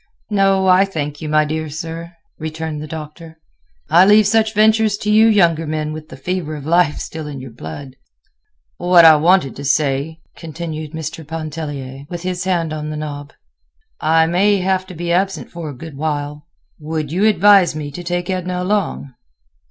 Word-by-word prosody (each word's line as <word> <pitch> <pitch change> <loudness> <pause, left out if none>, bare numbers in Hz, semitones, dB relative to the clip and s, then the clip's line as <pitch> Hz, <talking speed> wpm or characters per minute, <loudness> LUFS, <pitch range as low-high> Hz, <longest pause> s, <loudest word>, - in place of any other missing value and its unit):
"No, 195 -1 +3
I 185 +1 +5
thank 150 -6 -4
you, 155 - -4
my 155 0 +3
dear 155 +1 -3
sir," 165 +3 -7 0.3
returned 160 -1 -5
the 155 - -7
Doctor. 160 +1 -9 0.5
"I 175 - +6
leave 210 +2 +6
such 220 +1 +2
ventures 215 -1 +3
to 210 - -2
you 220 +1 +6
younger 170 -7 +3
men 155 0 -2
with 155 0 -9
the - - -10
fever 160 +1 -3
of 145 -2 -8
life 170 -2 +2
still 160 -1 -6
in 145 -2 -7
your 130 -1 -9
blood." 125 - -9 0.8
"What 175 -1 +6
I 160 -1 +9
wanted 165 -2 +3
to 140 - -7
say," 140 +2 0 0.2
continued 160 -1 -7
Mr. 160 0 -5
Pontellier, 145 -4 -6
with 175 -1 -6
his 180 0 -3
hand 170 -4 0
on 155 0 -5
the 155 - -5
knob; 145 -1 -6 0.7
"I 160 +1 +3
may 195 +5 +2
have 185 0 0
to 185 - -10
be 170 +1 -3
absent 190 +2 -1
a 165 -3 -5
good 150 +3 -10
while. 150 +1 -4 0.3
Would 155 -1 -4
you 190 +5 +1
advise 200 -4 +5
me 150 -2 -5
to 175 +5 -8
take 175 0 -2
Edna 180 -1 -2
along?" 185 -8 -2
160 Hz, 175 wpm, -18 LUFS, 150-185 Hz, 0.8 s, I